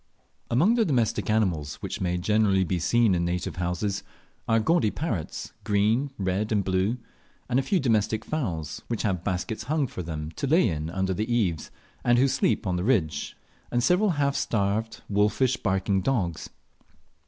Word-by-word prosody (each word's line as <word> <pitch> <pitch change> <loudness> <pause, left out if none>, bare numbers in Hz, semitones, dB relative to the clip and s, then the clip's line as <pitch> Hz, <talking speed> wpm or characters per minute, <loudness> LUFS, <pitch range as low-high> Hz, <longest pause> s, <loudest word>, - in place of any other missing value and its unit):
Among 160 - +4
the 235 -1 +3
domestic 125 - 0
animals 90 -10 +1
which - - -6
may 90 -1 0
generally 100 0 +2
be 90 0 -1
seen 115 +3 +3
in 85 -1 +1
native 85 0 -2
houses, 90 +3 -1 0.5
are 115 0 +3
gaudy 130 -2 +2
parrots, 105 - -4
green, 110 +7 +2
red, 95 +3 -1
and 105 -2 +2
blue, 95 +5 0 0.5
a 125 +2 +2
few 180 +8 +1
domestic 110 -4 +1
fowls, 80 - -3
which 115 -3 -2
have 95 -6 -1
baskets 105 +3 -3
hung 150 +2 +1
for 105 - -6
them 80 -2 -5
to 140 - -1
lay 160 +3 +4
in 80 -3 -2
under 95 +1 -1
the 110 +5 -2
eaves, 95 -10 0 0.3
and 120 0 +4
who 135 +3 +5
sleep 125 - +1
on 90 -2 0
the 90 - -2
ridge, 95 - 0 0.3
and 120 0 0
several 185 - +3
half 140 -1 +1
starved 110 +1 -1
wolfish 105 +5 +2
baking 95 -2 0
dogs. 90 - -1
105 Hz, 165 wpm, -26 LUFS, 90-120 Hz, 0.5 s, who